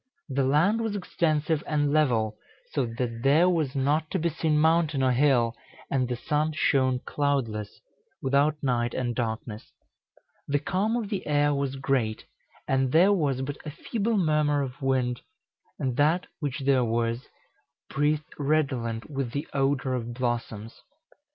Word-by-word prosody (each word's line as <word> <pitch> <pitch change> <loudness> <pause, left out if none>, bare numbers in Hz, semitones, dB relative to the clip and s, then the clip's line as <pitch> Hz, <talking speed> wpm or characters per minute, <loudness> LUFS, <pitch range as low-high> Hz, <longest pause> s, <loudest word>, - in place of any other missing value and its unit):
The 135 0 +1
land 160 +12 +3
was 220 -2 -2
extensive 160 -5 0
and 145 -1 +1
level, 115 -8 +2 0.4
so 135 -5 0
that 115 0 -4
there 145 +7 +5
was 160 -6 0
not 150 +4 +1
to - - -1
be 170 -1 0
seen 155 -1 0
mountain 160 -3 +3
or 130 - +3
hill, 125 -3 +3 0.4
and 130 -2 +1
the 125 - -2
sun 150 +5 -1
shone 130 -4 +2
cloudless, 120 -8 -2 0.4
without 140 +3 +2
night 120 -3 0
and 120 -2 -1
darkness; 110 -2 -4 0.8
the 145 - +2
calm 195 +9 0
of 225 -4 -2
the 195 -3 -3
air 145 0 +3
was 140 -1 -1
great, 130 -5 -1 0.4
and 135 -1 +1
there 180 +7 +5
was 140 -8 0
but 145 +2 -4
a 155 - -5
feeble 220 +8 -2
murmur 150 -4 +2
of 130 0 -7
wind, 130 -2 0 0.6
and 130 -2 -2
that 160 +5 +3
which 145 -3 -3
there 135 -2 +3
was, 115 +1 -1 0.6
breathed 150 +1 -1
redolent 135 -6 0
with 135 -5 -4
the 145 +2 -3
odor 135 -1 +1
of 120 -1 -3
blossoms." 115 -3 -3
140 Hz, 150 wpm, -27 LUFS, 125-155 Hz, 0.8 s, there